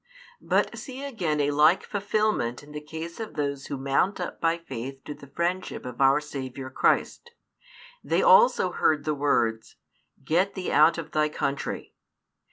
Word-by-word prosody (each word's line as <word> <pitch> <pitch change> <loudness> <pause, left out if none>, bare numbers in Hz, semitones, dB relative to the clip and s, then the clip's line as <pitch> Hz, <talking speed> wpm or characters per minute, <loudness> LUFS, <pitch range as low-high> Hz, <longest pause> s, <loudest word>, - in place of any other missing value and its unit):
But - - 0
see 265 0 -8
again 180 - -2
a 145 0 +2
like 155 +5 +4
fulfilment 205 - -1
in 150 - -14
the 150 0 -6
case 160 +4 -8
of 220 -1 -6
those 140 -2 -3
who 140 - -4
mount 135 +9 0
up 180 - -5
by 165 0 +2
faith 135 -4 -7
to 150 - -6
the 140 -1 -14
friendship 170 +5 -3
of 125 0 -6
our 135 +2 +5
Saviour 135 -3 -7
Christ. 470 - +1 0.7
They - - +1
also 480 0 +5
heard 150 -2 +1
the 155 - +1
words 115 -6 0 0.5
Get 175 +8 +1
thee 185 -2 -3
out 155 +3 +5
of 165 - -6
thy 155 0 +1
country. 140 -2 -3
150 Hz, 165 wpm, -26 LUFS, 140-180 Hz, 0.7 s, our